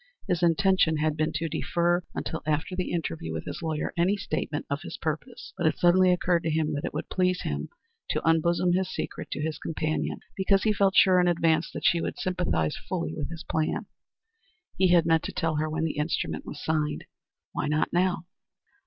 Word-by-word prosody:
His 175 -1 0
intention 170 -1 +3
had 155 0 +1
been 155 0 0
to 165 +2 -1
defer 175 +2 +1
until 160 - -3
after 155 +4 0
the 185 0 -2
interview 165 -1 -3
with - - -4
his - - -6
lawyer 160 -2 -2
any 185 +4 +2
statement 155 -5 -3
of 140 +1 -2
his - - -7
purpose, 165 - -5
but 170 - +2
it 155 - +1
suddenly 180 +1 +5
occurred 180 -1 +2
to 165 - -1
him 155 -1 0
that 145 - -2
it - - -3
would - - -4
please 185 -1 +1
him - - -3 0.4
to - - -1
unbosom 170 +2 +3
his 185 +1 +1
secret - - -5
to 150 - -3
his 160 -1 -3
companion 155 0 -2
because 195 0 +2
he 215 - +3
felt 195 -1 +2
sure 185 -1 +6
in 180 - +3
advance 165 -2 +2
that - - -6
she 170 - +4
would - - -3
sympathize 180 - 0
fully 80 - -2
with - - -4
his 165 -1 -7
plans. 155 -1 -1 0.9
He 190 - +4
had 175 -2 +5
meant 165 -1 +4
to - - -3
tell 160 -3 0
her 155 +1 0
when 160 +1 -2
the 160 -2 -2
instrument 150 +2 -2
was - - -7
signed. 155 -1 -1 0.5
Why - - -2
not 150 +1 0
now? 175 -1 +1
165 Hz, 205 wpm, -27 LUFS, 155-180 Hz, 0.9 s, sure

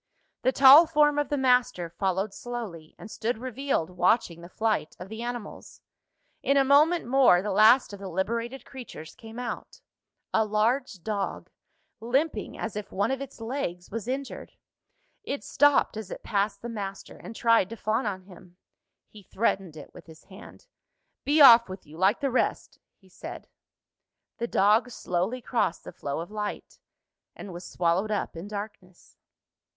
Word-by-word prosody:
The 260 - +2
tall 275 +5 +8
form 295 -2 +3
of 290 - -1
the 290 - 0
master 250 -9 +2
followed 190 +3 -2
slowly, 215 -11 -7
and 215 - -11
stood 230 +1 -2
revealed 255 - -2
watching 180 -1 +1
the 175 - -11
flight 220 -6 -1
of 180 +2 -9
the 220 +1 -7
animals. 240 -3 -7 0.6
In 275 - +2
a 275 - +5
moment 305 +5 +4
more, 245 -8 +4
the 210 - -2
last 215 +4 +5
of 200 - -8
the 195 - -7
liberated 230 +8 -3
creatures 240 - -10
came 225 0 -12
out 245 -1 -6 0.5
a 220 - +3
large 215 -1 -1
dog, 205 -3 -4 0.5
limping 240 +1 -1
as 225 - -5
if 210 -1 -6
one 200 +6 0
of 270 0 -2
its 275 - -9
legs 225 -7 -5
was 225 +1 -5
injured. 270 +2 -5 0.7
It 285 -9 -4
stopped 290 -5 +3
as 215 -3 -7
it - - -8
passed 200 0 -1
the - - -4
master, 200 -4 -7
and 230 - -10
tried 230 -5 +3
to 230 - -6
fawn 220 +3 -1
on 190 -2 -4
him. 180 -1 -16 0.5
He 210 - -15
threatened 190 -5 -2
it 150 - -12
with 175 - -14
his 160 0 -15
hand. 190 -1 -14 0.6
"Be 295 +2 +3
off 235 -5 +9
with 185 0 -9
you, 150 +1 -14
like 190 +6 +2
the 275 -2 0
rest!" 255 - -1 0.2
he 190 - -24
said. 185 - -10 0.9
The 235 - -2
dog 215 +4 +3
slowly 220 +3 -3
crossed 225 -9 -1
the - - -9
flow 140 +3 -4
of 175 - -9
light, 210 -1 -6 0.6
and 195 - -9
was 175 +1 -9
swallowed 175 +4 0
up 210 -4 -2
in 165 +4 -7
darkness. 200 -3 -9
215 Hz, 165 wpm, -27 LUFS, 190-250 Hz, 0.9 s, off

